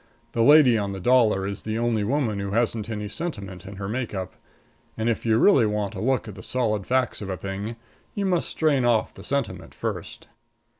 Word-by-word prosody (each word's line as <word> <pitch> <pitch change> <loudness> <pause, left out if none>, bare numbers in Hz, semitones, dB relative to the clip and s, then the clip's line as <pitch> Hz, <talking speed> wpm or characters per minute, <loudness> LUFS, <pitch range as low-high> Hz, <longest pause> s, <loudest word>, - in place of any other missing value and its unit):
The 115 - 0
lady 135 -3 +7
on 100 -1 -2
the 95 - -5
dollar 110 -3 +3
is 100 0 -4
the 110 0 -3
only 115 -2 +1
woman 115 -3 0
who 100 0 -3
hasn't 115 -1 0
any 105 -2 -3
sentiment 100 - -5
in 100 - -8
her 95 0 -5
make 120 0 -3
up. 95 -1 -4 0.6
And 110 +1 -1
if 115 0 -1
you 110 0 +4
really 130 - +5
want 105 -1 -2
a 95 - -5
look 130 +3 +1
at - - -7
the - - -10
solid 110 -6 -1
facts 130 -3 0
of 100 - -5
a 95 - -3
thing 100 +4 -5 0.4
you 200 - -1
must 175 -8 +1
strain 150 -5 +2
off 120 -2 +2
the - - -12
sentiment 115 -10 -3
first. - - -5
110 Hz, 210 wpm, -25 LUFS, 100-125 Hz, 0.6 s, lady